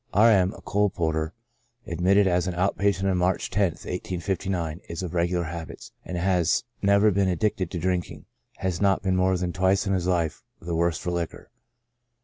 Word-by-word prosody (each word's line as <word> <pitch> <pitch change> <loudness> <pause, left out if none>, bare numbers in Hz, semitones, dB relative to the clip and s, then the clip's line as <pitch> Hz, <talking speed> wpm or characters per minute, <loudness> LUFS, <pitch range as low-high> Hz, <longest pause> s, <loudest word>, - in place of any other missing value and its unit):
R. 110 +3 +7
M 95 -3 +4
—, - - -12
a - - -14
coal 105 0 +1
porter, 80 -2 -1 0.5
admitted 95 +4 +3
as 90 -1 +1
out 90 +2 0
patient 100 0 +1
on 95 -2 +1
March 90 +1 0
loth, 100 - -1 0.3
1859, 90 -2 -3
^^ 85 +2 -4
°^ - - -11
regular 85 0 +1
habits, 85 -1 -7
and 90 - -5
has 90 -2 +2 0.2
never 100 +2 +4
been 95 0 +2
ad 90 - 0
dicted 95 -2 0
to 90 - -5
drinking; 90 +1 -2 0.3
has 95 -2 -2
not 100 -1 +2
been 95 -2 +1
more 95 0 +2
than 90 0 -2
twice 95 +2 +2
in 100 - 0
his 90 -2 0
life 85 -4 0 0.2
the 85 0 -4
worse 85 0 +1
for 90 - -3
liquor. 85 -2 -4
90 Hz, 190 wpm, -25 LUFS, 85-95 Hz, 0.5 s, R